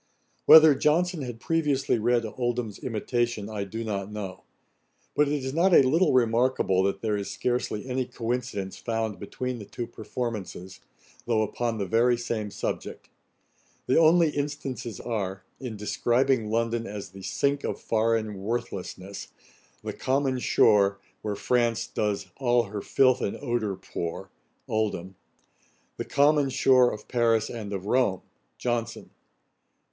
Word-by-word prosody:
Whether 160 Hz, -1 st, +10 dB
Johnson 160 Hz, +4 st, +1 dB
had 120 Hz, -3 st, -6 dB
previously 145 Hz, -5 st, +1 dB
read 120 Hz, +1 st, +2 dB
Oldham's 120 Hz, -2 st, -3 dB
imitation, 120 Hz, -3 st, -2 dB
I 100 Hz, -2 st, -3 dB
do 110 Hz, +3 st, -5 dB
not 100 Hz, -2 st, -3 dB
know; 100 Hz, -3 st, -7 dB, 0.7 s
but 150 Hz, -, +4 dB
it 145 Hz, -1 st, -1 dB
is 130 Hz, -, -3 dB
not 175 Hz, +3 st, +4 dB
a -, -, +8 dB
little 160 Hz, +6 st, +3 dB
remarkable, 120 Hz, -5 st, +2 dB
that 100 Hz, 0 st, -1 dB
there 110 Hz, -2 st, +1 dB
is 100 Hz, -2 st, -3 dB
scarcely 120 Hz, -3 st, -2 dB
any 130 Hz, 0 st, -1 dB
coincidence 115 Hz, -5 st, -3 dB
found 115 Hz, -2 st, -3 dB
between 125 Hz, +4 st, -4 dB
the 105 Hz, -, -8 dB
two 120 Hz, -, -5 dB
performances, 105 Hz, -6 st, -6 dB, 0.5 s
though 110 Hz, -2 st, +2 dB
upon 115 Hz, +1 st, -2 dB
the 100 Hz, -, -1 dB
very 120 Hz, +4 st, +3 dB
same 115 Hz, -3 st, -3 dB
subject. -, -, -5 dB, 0.8 s
The 130 Hz, -, +3 dB
only 165 Hz, 0 st, +5 dB
instances 140 Hz, -7 st, -4 dB
are, 100 Hz, -5 st, -3 dB, 0.2 s
in 125 Hz, -5 st, -6 dB
describing 120 Hz, +3 st, +1 dB
London 115 Hz, +1 st, 0 dB
as 100 Hz, -3 st, -7 dB
the 95 Hz, 0 st, -11 dB
sink 140 Hz, +9 st, 0 dB
of -, -, -3 dB
foreign 110 Hz, -3 st, 0 dB
worthlessness: 100 Hz, -3 st, -5 dB, 0.3 s
' -, -, -33 dB
the -, -, -4 dB
common 135 Hz, -1 st, 0 dB
shore, 100 Hz, -4 st, +4 dB, 0.2 s
Where 105 Hz, -1 st, -3 dB
France 120 Hz, 0 st, +1 dB
does 105 Hz, -2 st, -2 dB
all 120 Hz, -2 st, +3 dB
her 105 Hz, -1 st, -6 dB
filth 130 Hz, +3 st, +3 dB
and 100 Hz, -, -2 dB
ordure 120 Hz, -7 st, -1 dB
pour.' 90 Hz, +1 st, -5 dB, 0.4 s
OLDHAM. 100 Hz, -4 st, -2 dB, 0.8 s
'The -, -, -4 dB
common 145 Hz, 0 st, +3 dB
shore 130 Hz, -1 st, +4 dB
of 105 Hz, -, -8 dB
Paris 115 Hz, -3 st, +2 dB
and 110 Hz, -4 st, -6 dB
of 95 Hz, -1 st, -4 dB
Rome.' 105 Hz, -5 st, +1 dB, 0.3 s
JOHNSON. 120 Hz, -1 st, -3 dB
115 Hz, 140 wpm, -27 LUFS, 105-130 Hz, 0.8 s, Whether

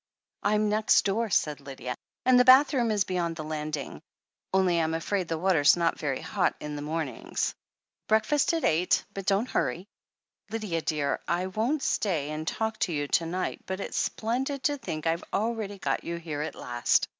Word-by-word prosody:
"I'm 210 Hz, +1 st, +2 dB
next 215 Hz, +1 st, +3 dB
door," 215 Hz, +3 st, 0 dB
said 150 Hz, -5 st, +1 dB
Nathalie, 135 Hz, -3 st, -6 dB, 0.3 s
"and 255 Hz, -1 st, +6 dB
the -, -, +7 dB
bathroom 255 Hz, -1 st, +6 dB
is 210 Hz, -2 st, +2 dB
beyond 175 Hz, -3 st, -2 dB
the 155 Hz, -, -5 dB
landing 150 Hz, -2 st, -4 dB, 0.3 s
— -, -, -63 dB
only 190 Hz, -2 st, +3 dB
Tm 160 Hz, -1 st, +1 dB
afraid 185 Hz, +2 st, -1 dB
the 165 Hz, -, -2 dB
water's 170 Hz, -3 st, +4 dB
not 170 Hz, -1 st, +1 dB
very 140 Hz, -4 st, -2 dB
hot -, -, 0 dB
in 150 Hz, 0 st, -5 dB
the 145 Hz, -, -5 dB
mornings. 150 Hz, -4 st, -2 dB, 0.5 s
Breakfast 220 Hz, +9 st, +3 dB
at 325 Hz, -, -2 dB
eight, 170 Hz, +3 st, +2 dB
but 195 Hz, -1 st, -6 dB
don't 200 Hz, +5 st, +2 dB
hurry; 180 Hz, +3 st, -1 dB, 0.6 s
Lydia, 210 Hz, -7 st, -2 dB
dear, 150 Hz, -3 st, -1 dB
I 175 Hz, +2 st, 0 dB
won't 225 Hz, +10 st, -1 dB
stay 155 Hz, -8 st, 0 dB
and 155 Hz, +1 st, -5 dB
talk 220 Hz, +3 st, -2 dB
to 180 Hz, -, 0 dB
you 145 Hz, -2 st, -1 dB
to 165 Hz, -, +2 dB
night, 185 Hz, +2 st, -3 dB
but 190 Hz, 0 st, -3 dB
it's -, -, -5 dB
splendid 260 Hz, +5 st, -1 dB
to 290 Hz, +2 st, +1 dB
think 155 Hz, -10 st, -5 dB
I've 165 Hz, +1 st, 0 dB
really 215 Hz, -2 st, -1 dB
got -, -, -1 dB
you 170 Hz, -, -3 dB
here 160 Hz, -3 st, -4 dB
at 155 Hz, -, -4 dB
last." 120 Hz, -1 st, +1 dB
180 Hz, 185 wpm, -28 LUFS, 155-215 Hz, 0.6 s, the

